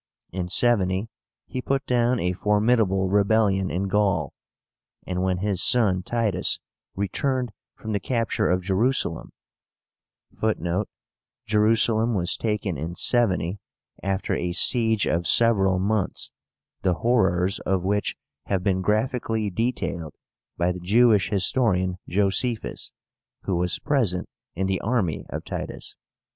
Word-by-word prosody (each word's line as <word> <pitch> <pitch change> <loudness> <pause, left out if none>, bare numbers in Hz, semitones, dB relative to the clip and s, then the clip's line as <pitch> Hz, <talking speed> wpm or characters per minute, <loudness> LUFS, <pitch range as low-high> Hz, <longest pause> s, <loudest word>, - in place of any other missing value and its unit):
In 90 -1 -3
70 95 0 +2 0.4
he 130 - -5
put 135 +1 -1
down 125 0 +2
a 90 +1 0
formidable 105 -1 +2
rebellion 100 -1 +2
in 95 +3 -2
Gaul; 95 -7 +1 0.7
and 90 0 -2
when 95 -1 +1
his 95 -1 0
son 100 -7 +3
Titus 115 +1 0 0.4
returned 125 +5 -1 0.2
from 110 - -6
the 100 - 0
capture 115 -6 0
of 90 +1 +1
Jerusalem, 100 -2 0 1.1
(Footnote: 100 -2 -1 0.6
Jerusalem 110 +1 +2
was 90 -1 0
taken 105 -8 -2
in 85 +4 -4
70, 100 -6 +2 0.4
after 95 0 -1
a 90 0 -1
siege 110 +1 +3
of 85 +2 0
several 100 -5 +4
months, 100 +1 -1 0.5
the 90 -2 +1
horrors 95 -5 +1
of 95 -1 -1
which 100 +2 0 0.3
have 95 -2 0
been 95 -1 +1
graphically 110 +1 0
detailed 95 - -2 0.4
by 85 +1 +1
the 90 - -5
Jewish 105 +2 +4
historian 95 -3 +1
Joséphus, 105 +5 -1 0.5
who 95 - -1
was 90 0 0
present 110 -11 0 0.3
in 95 +3 -1
the 95 -1 -1
army 110 -8 -1
of - - -6
Titus. - - -6
100 Hz, 125 wpm, -24 LUFS, 90-115 Hz, 1.1 s, several